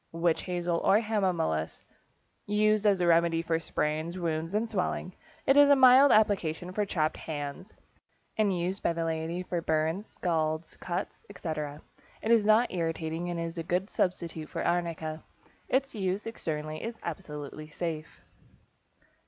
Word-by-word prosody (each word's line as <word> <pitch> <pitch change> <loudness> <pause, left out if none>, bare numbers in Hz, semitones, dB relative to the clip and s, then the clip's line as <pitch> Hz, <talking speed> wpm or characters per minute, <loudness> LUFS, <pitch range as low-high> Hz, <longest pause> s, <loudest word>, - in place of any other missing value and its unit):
=Witch 165 0 +1
Hazel 175 -2 -1
or 205 - +4
Hamamelis.= 185 - -1 0.6
Used 215 0 +3
as 195 -3 +3
a - - +3
remedy 165 -1 +3
for 165 -1 0
sprains, 155 +2 -2
wounds, 165 +1 -2
and 220 +2 +1
swelling. 185 -3 -2 0.3
It 270 - +5
is 285 0 +7
a 285 - +8
mild 265 +1 +7
application 180 -5 +2
for 205 +2 -1
chapped 155 -5 0
hands, 145 +3 -5 0.7
and 215 -2 +2
used 180 +3 -1
by 170 - +1
the 165 0 -2
laity 165 +2 -2
for 175 -1 -2
burns, 160 +5 0
scalds, 160 -2 -2
cuts, 180 +2 -4
etc. 155 -6 -5 0.4
It 225 - +1
is 230 -2 +6
not 215 +2 +4
irritating, 165 0 -2
and 175 -1 -3
is 165 0 -4
a - - -2
good 180 +4 -1
substitute 170 -4 -2
for - - -3
arnica. 165 -2 -1 0.5
Its 270 +1 +1
use 195 -2 -2
externally 155 -8 -4
is 230 0 -5
absolutely 150 -2 -6
safe. 155 -1 -5
170 Hz, 150 wpm, -29 LUFS, 160-200 Hz, 0.7 s, a